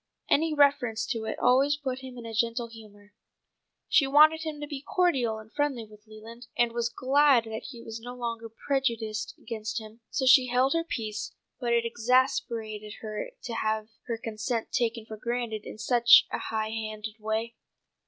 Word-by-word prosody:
Any 315 +1 +3
reference 275 -6 +3
to 225 -1 -2
it - - -3
always 275 +3 +3
put 265 -3 -4
him 260 -1 -10
in 235 - -8
a 225 - -6
gentle 230 +1 0
humour. 210 -2 -15 0.7
She 275 - +4
wanted 310 +3 +6
him 310 -2 -5
to 295 - -4
be 290 -2 -6
cordial 275 - +1
and 220 0 -13
friendly 285 -6 -1
with 210 0 -18
Leland, 225 +3 -12
and 240 -1 +3
was 235 0 -1
glad 265 0 +4
that 220 -1 -6
he 235 -4 -9
was 225 0 -7
no 245 +1 -8
longer 230 -2 -4
prejudiced 225 -4 -2
against 220 0 -4
him, 220 +1 -12
so 265 - -1
she 260 -1 +7
held 255 +2 +2
her 330 0 +1
peace; 215 -9 -4 0.2
but 240 -2 -1
it 235 0 +2
exasperated 230 -3 0
her 215 - -5
to 235 - -5
have 220 -1 -1 0.2
her 230 -2 -2
consent 225 +1 -3
taken 230 -1 -1
for 220 -1 -8
granted 235 -2 -3
in - - -8
such 235 +2 +6
a - - -2
high 220 -1 -2
handed 215 -1 -5
way. 220 +2 -2
235 Hz, 180 wpm, -28 LUFS, 220-260 Hz, 0.7 s, she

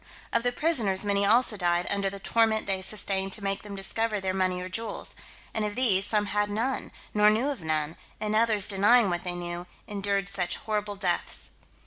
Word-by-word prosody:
Of - - +3
the 245 +1 0
prisoners 230 - +1
many 200 0 +2
also 230 0 +5
died 175 -1 +1
under 200 -1 0
the 200 - -8
torment 220 +2 +1
they 190 -1 -1
sustained 195 -1 +2
to 210 - -3
make 195 0 -1
them 205 -1 -8
discover 210 +2 0
their 190 -1 -2
money 185 -1 0
or 180 - -5
jewels; 215 +3 -5 0.4
and 220 - -1
of 210 0 -3
these, 205 -6 +3
some 210 -1 +2
had 205 +1 0
none, 235 +6 -2 0.2
nor 210 0 +5
knew 225 +7 +1
of 280 -8 -4
none, 155 0 -2 0.2
and 215 0 -1
others 215 -3 +3
denying 205 +2 +4
what 175 0 -2
they 180 -1 -3
knew, 175 0 -6 0.2
endured 200 -1 -1
such 185 -3 -1
horrible 210 -1 -3
deaths. 185 -3 -1
200 Hz, 195 wpm, -27 LUFS, 190-215 Hz, 0.4 s, also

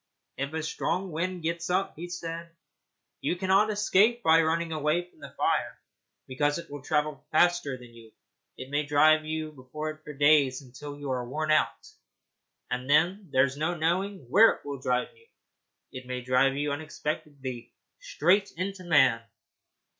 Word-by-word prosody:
'If 140 +2 -3
a 160 0 -2
strong 180 +3 -2
wind 180 +2 -3
gets 170 +1 -2
up,' 185 +2 0
he 175 +3 -7
said, 170 -1 -6 0.7
'you - - -1
cannot 190 +4 +3
escape 215 +3 +3
by 160 +1 +6
running 165 +1 0
away 155 +3 0
from - - -27
the - - -9
fire, - - -1 0.5
because 145 +3 0
it 170 -3 -9
will 145 -1 -7
travel 150 0 -1
faster 175 -4 +2
than 120 -2 -14
you. 115 -1 -15 0.5
It 130 +1 -9
may 145 +1 +1
drive 155 +2 +4
you 155 0 -3
before 150 +3 -6
it 155 0 -15
for 150 - -8
days, 145 -2 +4
until 145 +3 -9
you 145 -2 -5
are 125 -1 -1
worn 155 +3 -1
out, 155 - +1 0.8
and 125 +1 -3 0.4
there's 130 +1 +2
no 160 +4 -1
knowing 175 -1 -1
where 210 - +7
it - - -16
will 140 -1 -5
drive 125 - -1
you. 460 0 -24 0.6
It 130 -1 -9
may 125 0 -4
drive 130 +2 +2
you 145 0 -1
unexpectedly 145 -4 -5 0.3
straight 195 +5 +1
into 185 +1 -4
man. 135 -9 +4
155 Hz, 160 wpm, -28 LUFS, 140-175 Hz, 0.8 s, where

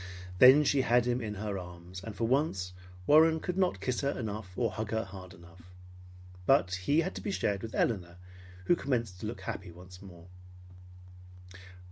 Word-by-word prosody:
Then 130 +4 +8
she 140 -1 +2
had 120 -1 +3
him 125 0 0
in 105 -2 -4
her 100 -1 -4
arms; 90 +1 -10
and 110 -1 -7
for 115 - -3
once 115 - 0 0.3
Warren 160 - +5
could 180 +2 -4
not 185 - +1
kiss 120 +6 -2
her 140 - 0
enough 110 -4 -5
or 115 -3 0
hug 110 +2 -4
her 110 0 -1
hard 95 -3 -11
enough. 85 +1 -17 0.8
But 90 +1 +4
he 95 - +1
had 185 +3 -3
to - - -7
be - - -4
shared 100 - -1
with 115 - -7
Elinor 90 -6 -1 0.5
who 175 - +4
commenced 115 - -2
to 105 - -5
look 115 - -6
happy 100 -5 -6
once 90 +2 -13
more. 90 -4 -13
105 Hz, 180 wpm, -30 LUFS, 90-125 Hz, 0.8 s, Then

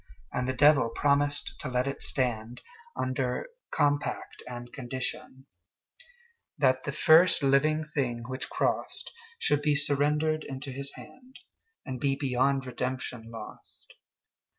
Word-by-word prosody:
And 125 0 -1
the - - +1
Devil 145 -3 +5
promised 145 +3 +1
to - - -4
let 125 0 0
it 140 - -4
stand, 120 -3 -1 0.3
Under 130 - -2 0.2
compact 145 0 -1
and 120 -1 -8
conditionThat 130 0 -5 1.4
the 140 - -2
first 160 +2 +5
living 150 +3 +3
thing 130 -6 -2
which 130 +1 -5
crossedShould 460 - -2
be 150 -1 +2
surrendered 150 +2 +2
into 135 +1 -6
his 140 +2 -4
hand, 260 +1 -14 0.5
And 130 -1 -5
be 135 +1 +1
beyond 135 0 +1
redemption 125 -2 -4
lost. 115 -1 -11
135 Hz, 115 wpm, -29 LUFS, 125-145 Hz, 1.4 s, Devil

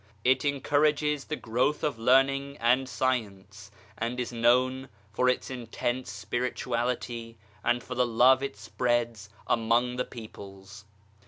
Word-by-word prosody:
It 130 +1 +3
encourages 145 +1 +1
the 155 - -3
growth 125 +4 -1
of 145 -7 -1
learning 135 +3 +3
and 125 +3 +2
science 105 -6 -3 0.3
and 120 +2 -3
is 125 -1 -3
known 125 +3 +2 0.2
for 125 +3 +2
its 125 - -1
intense 120 0 -3
Spirituality 120 +1 -3 0.3
and 120 0 +1
for 125 - -6
the 125 0 +1
love 125 +3 +5
it 140 0 -4
spreads 120 -4 -1 0.2
among 120 +2 +1
the 125 - -1
peoples. 100 -2 -11
125 Hz, 130 wpm, -28 LUFS, 115-130 Hz, 0.3 s, love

